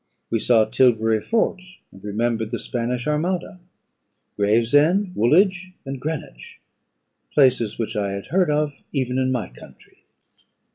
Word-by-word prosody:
We 115 - +1
saw 110 -1 +3
Tilbury 110 -2 +2
Fort, 220 - 0 0.3
and 95 - -16
remembered 110 +1 -1
the 120 - -3
Spanish 120 +1 -3
armada; 175 +4 -2 0.8
Gravesend, 145 - +2
Woolwich, 185 - +2
and 135 -1 -5
Greenwich, 150 - -6 0.8
places 125 -6 +3
which 110 0 -3
I 100 -2 -1
had 100 0 -6
heard 180 -1 +2
of 150 -1 -1
even 130 -2 -1
in 130 0 +1
my 125 -3 -2
country. - - -17
125 Hz, 130 wpm, -22 LUFS, 110-150 Hz, 0.8 s, saw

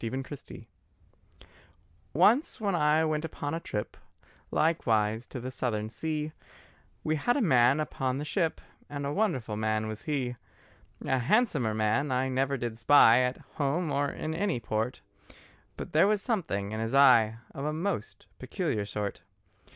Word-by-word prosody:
THE 115 - -2
WITCH'S 135 +3 -6
BOX 115 - -11 1.5
Once 215 - +3
when 205 -3 0
I 155 -1 +3
went 155 0 -1
upon 145 -2 -4
a 165 - -1
trip 105 -10 -5 0.5
Likewise 110 -8 +1
to 130 - -7
the 130 +2 -5
Southern 110 -4 -2
sea, 155 +6 -3 0.7
We 155 0 0
had 245 - +1
a - - +1
man 130 - +4
upon 135 -4 -2
the 145 - -4
ship 165 +1 -1 0.3
And 145 -1 -4
a 140 - -2
wonderful 140 - -1
man 110 0 0
was 110 0 -6
he. 130 -5 -2 0.7
A 130 - +1
handsomer 140 - +2
man 110 +6 +1
I 130 +1 +1
never 135 +1 0
did 120 -2 -4
spy, 120 -1 +7
At 125 +1 -1 0.2
home 150 +3 0
or 140 0 +1
in 155 - -4
any 175 -5 -1
port; 110 +2 -3 0.8
But - - -7
there 160 +5 +5
was 210 0 +2
something 165 - -2
in 110 - -3
his 115 +4 -2
eye 115 -5 +6 0.2
Of 135 - -6
a 150 - -1
most 160 - -4
peculiar 100 -1 -2
sort. 105 -1 -4
135 Hz, 160 wpm, -29 LUFS, 115-155 Hz, 1.5 s, spy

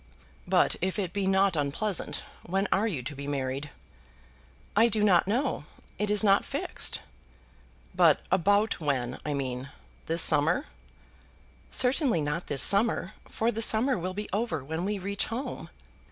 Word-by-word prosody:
"But - - +3
if 190 +3 -1
it 185 -4 -3
be 200 -2 -1
not 190 -1 +3
unpleasant, 155 +8 -2 0.2
when 195 +3 -1
are 210 +3 +2
you 155 - -3
to 145 +4 -6
be 140 +1 -7
married?" 140 0 -3 1.1
"I 225 +3 +5
do 215 -1 +1
not 185 -3 +4
know. 240 - -1 0.3
It 210 0 0
is 210 0 +4
not 200 -1 +4
fixed." - - -1 0.9
"But - - +4
about 200 +4 +2
when, 130 -5 -2
I 150 -1 -2
mean? 130 -1 -4 0.4
This 165 +1 +3
summer?" 160 - +3 1.0
"Certainly 255 - +2
not 150 +4 -3
this 140 -2 +2
summer, 205 -1 +2 0.2
for 225 +2 0
the 225 - -3
summer 230 +4 +3
will 185 +1 -4
be 210 +1 -4
over 200 - -2
when 160 +4 -3
we 205 +1 -1
reach 200 +1 -2
home." 245 +5 -5
190 Hz, 155 wpm, -28 LUFS, 150-210 Hz, 1.1 s, I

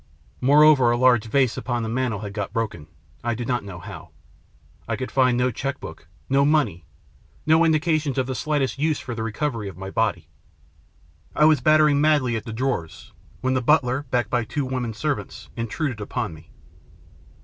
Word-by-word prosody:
More 145 +4 +6
over, 145 -6 +6
a 120 - +2
large 125 -3 +4
vase 125 +1 +1
upon 120 -2 -2
the - - -3
mantel 115 -3 -2
had 100 -2 -6
got 100 -2 -4
broken 105 -9 -3 0.4
I 120 -1 -1
do 120 +1 -4
not 125 -1 -1
know 95 -3 -8
how. 95 -2 -10 0.8
I 115 - -1
could 130 +3 -5
find 130 -2 +3
no 125 +1 +1
cheque 135 +4 -4
book, 80 -1 -10 0.2
no 135 +1 +3
money, 140 - +1 0.6
no 160 +2 +5
indications 155 -3 +1
of 130 - +1
the 130 - -3
slightest 140 0 -1
use 155 0 +1
for 125 - -6
the 115 - -5
recovery 115 -1 -3
of 90 - -12
my 95 +1 -7
body. 110 -3 -1 1.1
I 150 - +5
was 155 -4 +4
battering 155 0 +4
madly 145 -6 +2
at 110 - -4
the 115 - -6
drawers, 115 -8 -3 0.3
when 130 0 0
the 130 - +1
butler, 135 0 +2
backed 125 -1 0
by 120 -2 +1
two 140 +5 -3
women 125 -4 -3
servants, 150 +3 -4
intruded 115 +1 -3
upon 100 -4 -3
me. 80 +1 -15
125 Hz, 185 wpm, -23 LUFS, 110-145 Hz, 1.1 s, More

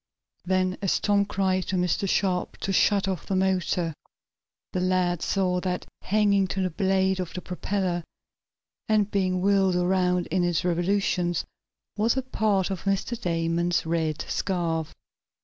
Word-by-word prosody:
Then, 185 0 0
as 195 - +1
Tom 205 -1 +2
cried 190 -2 0
to 190 - -1
Mr. 180 +2 0
Sharp 185 -2 0
to 195 - -1
shut 195 +1 +3
off 185 -4 -3
the 195 - -1
motor, 185 -3 +1 0.8
the 185 - 0
lad 180 -2 +1
saw 185 -2 +1
that, 180 0 -3 0.2
hanging 200 -1 +2
to 190 +1 -2
the 185 - -1
blade 190 +1 +1
of 180 -2 -4
the 180 - -4
propeller, 180 -1 -2 0.9
and 210 -1 +2
being 185 -2 +1
whirled 195 -1 +3
around 180 0 +2
in 180 +1 +2
its 175 0 0
revolutions, 175 -1 0 0.5
was 225 +4 +2
a 265 - 0
part 210 -6 0
of 190 -1 -5
Mr. 195 +4 0
Damon's 170 0 0
red 160 -2 -1
scarf. 165 -4 -1
185 Hz, 150 wpm, -26 LUFS, 175-195 Hz, 0.9 s, shut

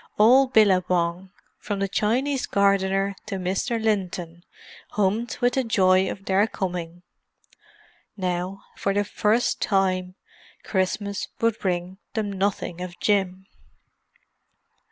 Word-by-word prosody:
All 255 +6 +6
Billabong, 185 -5 +2 0.3
from 205 - -3
the 195 0 0
Chinese 255 +8 0
gardener 195 0 +2
to 200 - -3
Mr. 190 +6 -1
Linton, 180 -6 -2 0.5
hummed 210 +4 0
with 245 0 +3
the 265 - +1
joy 190 -4 +3
of 195 - -7
their 195 +3 +3
coming. 175 -4 -5 1.1
Now, 185 +1 -3
for 195 0 -1
the 205 - +2
first 215 +3 +1
time, 185 -2 0 0.5
Christmas 200 +1 -1
would 230 -1 +1
bring 180 0 -2 0.2
them 215 -2 -1
nothing 190 -3 -2
of 180 -1 -7
Jim. 190 -2 0
195 Hz, 115 wpm, -24 LUFS, 185-210 Hz, 1.1 s, All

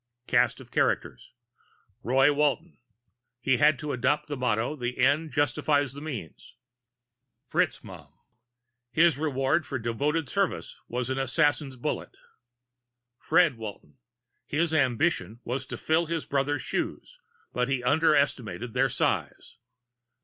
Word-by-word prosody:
CAST - - +2
OF - - -14
CHARACTERS - - -1 0.7
ROY 135 +4 +4
WALTON 150 +3 0 0.6
He 130 0 +2
had 150 +3 +4
to 150 +2 -4
adopt 145 +4 0
the 145 - -3
motto 125 +1 0
the 125 -3 -4
ends 150 +4 +2
justify 145 +1 +2
the 140 +1 -7
means. 125 - -8 1.0
FITZMAUGHAM - - -2 0.8
His 160 +1 +4
reward 145 +1 +1
for 140 - -4
devoted 140 +7 -1
service - - -1
was 125 +1 -3
an 130 - -1
assassin's 145 +1 +1
bullet. 125 - -4 1.0
FRED 160 -5 +3
WALTON 110 +3 -9 0.5
His 160 +2 0
ambition 125 - +1
was 130 +2 -4
to - - -6
fill 160 +1 +1
his 165 -1 -2
brother's 140 -1 -1
shoes - - -4 0.3
but 125 +2 0
he 130 -2 -1
underestimated 140 -5 +1
their 135 +1 +2
size. - - -2
140 Hz, 120 wpm, -27 LUFS, 125-150 Hz, 1.0 s, ROY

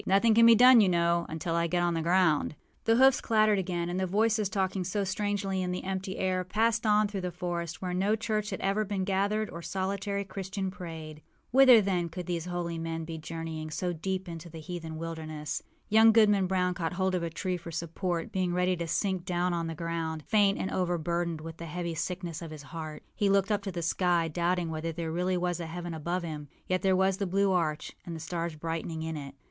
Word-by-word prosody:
Nothing 200 +4 +4
can 230 +1 +7
be 230 - +9
done, 250 0 +8
you 195 - +4
know, 170 -1 +2
until 160 +1 -3
I 170 0 +1
get 175 +1 +1
on 175 0 +2
the 165 - -1
ground.â 170 -3 +2 0.3
The 225 - +4
hoofs 265 +2 +5
clattered 215 -2 +3
again; 175 -2 -2
and 175 +1 -2
the 190 - 0
voices, 215 +1 +2
talking 190 -1 -1
so 200 +3 -1
strangely 195 0 -1
in 180 -1 -1
the 180 - -3
empty 190 0 -3
air, 185 -1 0
passed 220 +4 +1
on 210 0 +4
through 200 -2 -4
the 180 - -2
forest, 175 -1 -4
where 180 -1 -2
no 195 +4 +2
church 215 -1 -2
had 190 - -4
ever 200 +2 +1
been 200 -2 -2
gathered 200 +3 0
or 170 - -7
solitary 200 +2 -2
Christian 190 0 -4
prayed. 160 -4 -8 0.3
Whither, 255 -3 +8
then, 180 -4 0
could 175 +2 -6
these 170 -1 -2
holy 175 -2 -3
men 165 0 -3
be 160 0 -6
journeying 160 -1 -5
so 175 +3 -2
deep 190 +3 -3
into 170 0 -7
the 165 0 -9
heathen 160 -1 -6
wilderness? 155 -2 -4 0.3
Young 220 +1 +7
Goodman 210 -4 +4
Brown 180 -1 +1
caught 170 -1 -3
hold 190 +1 0
of 180 - 0
a 170 - -2
tree 180 +2 -2
for 170 -1 -9
support, 170 +1 -3
being 180 -2 0
ready 180 0 +2
to 170 0 -3
sink 190 +1 0
down 180 -1 0
on 170 -1 -1
the 165 - -4
ground, 165 -1 -3
faint 205 -2 +3
and 190 - -3
overburdened 170 -2 -1
with 165 0 -8
the 170 - -7
heavy 170 +1 -3
sickness 175 0 -4
of 165 - -6
his 155 -2 -9
heart. 155 +1 -7
He 205 - +1
looked 195 +1 +3
up 205 -1 +1
to 200 -1 -4
the 170 -1 -4
sky, 170 -1 +1
doubting 175 +1 0
whether 160 +1 -3
there 165 0 -4
really 180 +2 0
was 175 0 -1
a 170 - -4
heaven 175 +1 -5
above 170 +3 -2
him. 150 -3 -6 0.2
Yet 185 0 0
there 190 -1 +3
was 190 0 +2
the 200 - -1
blue 195 +2 +2
arch, 160 -4 0
and 170 - -6
the - - -6
stars 165 0 -3
brightening 165 0 -4
in 160 0 -3
it. 140 -2 -7
180 Hz, 225 wpm, -29 LUFS, 165-195 Hz, 0.3 s, be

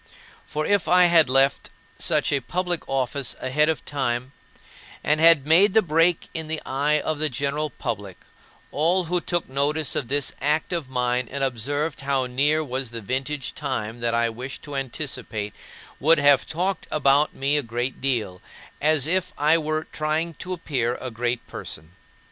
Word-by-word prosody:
For 155 0 -2
if 205 -2 +2
I 180 0 +6
had 170 -5 +5
left 135 +1 +2 0.3
such - - +1
a 140 - +2
public 175 +5 -2
office 135 0 -1
ahead 150 +4 +2
of 160 - -2
time, 130 -2 -2 0.7
and 150 +1 +2
had 165 -4 +6
made 180 +6 +5
the 220 - +6
break 165 +1 +2
in 160 -2 -4
the 160 0 -1
eye 145 +3 +1
of 155 0 -2
the 155 0 0
general 140 +4 -1
public, 105 -9 -5 0.5
all 170 +5 +2
who 175 +1 -1
took 175 -1 -2
notice 145 +2 0
of - - -2
this 140 +2 0
act 150 +5 0
of 165 -6 -3
mine 125 -1 0
and 140 0 -3
observed 140 +5 -2
how 135 -1 0
near 145 +5 +2
was 130 -2 -3
the 115 0 -7
vintage 130 +5 -3
time 120 -6 -4
that 115 0 0
I 115 0 +2
wished 125 +4 -7
to 145 -1 -7
anticipate 125 -6 -4 0.5
would 160 +4 +5
have 145 -2 +4
talked 185 +4 -2
about 145 0 +3
me 140 +2 +1
a 145 - +2
great 120 +1 -4
deal, 115 -9 -1 0.4
as 150 -2 +3
if 180 +2 -1
I 155 +3 +4
were 155 0 -2
trying 155 +2 -2
to 185 - -6
appear 130 -8 -2
a 130 - -5
great 120 +1 -2
person. 80 +2 -8
140 Hz, 170 wpm, -24 LUFS, 125-155 Hz, 0.7 s, I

